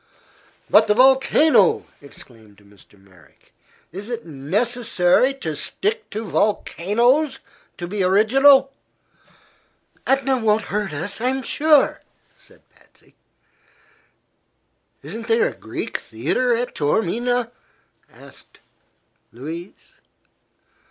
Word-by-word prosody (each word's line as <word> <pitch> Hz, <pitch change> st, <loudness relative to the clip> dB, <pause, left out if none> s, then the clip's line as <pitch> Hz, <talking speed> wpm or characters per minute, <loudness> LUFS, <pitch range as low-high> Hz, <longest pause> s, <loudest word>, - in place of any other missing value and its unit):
"But 220 Hz, +1 st, +4 dB
the 210 Hz, -, +2 dB
volcano!" 270 Hz, -, +4 dB, 0.2 s
exclaimed 115 Hz, -7 st, -16 dB
Mr. 100 Hz, 0 st, -22 dB
Merrick. 90 Hz, -7 st, -24 dB, 0.4 s
"Is 195 Hz, +6 st, -9 dB
it 235 Hz, -1 st, -5 dB
necessary 190 Hz, -, 0 dB
to 160 Hz, -, -5 dB
stick 435 Hz, -, -2 dB
to 220 Hz, +2 st, -6 dB
volcanoes 235 Hz, -, 0 dB, 0.4 s
to 175 Hz, -, -6 dB
be 200 Hz, +2 st, -4 dB
original?" 270 Hz, +8 st, +4 dB, 1.3 s
"Etna 270 Hz, 0 st, +1 dB
won't 220 Hz, -1 st, +1 dB
hurt 210 Hz, -3 st, -2 dB
us, 175 Hz, +9 st, -5 dB
I'm 260 Hz, +2 st, -1 dB
sure," 300 Hz, 0 st, +2 dB, 0.3 s
said -, -, -23 dB
Patsy. -, -, -26 dB, 1.9 s
"Isn't 225 Hz, 0 st, -8 dB
there 225 Hz, -1 st, +2 dB
a -, -, -10 dB
Greek 110 Hz, -, -6 dB
theatre 150 Hz, -, -2 dB
at 245 Hz, +2 st, -4 dB
Taormina?" 230 Hz, +10 st, -1 dB, 0.6 s
asked -, -, -17 dB, 0.7 s
Louise. 160 Hz, -, -10 dB
220 Hz, 95 wpm, -21 LUFS, 165-255 Hz, 1.9 s, But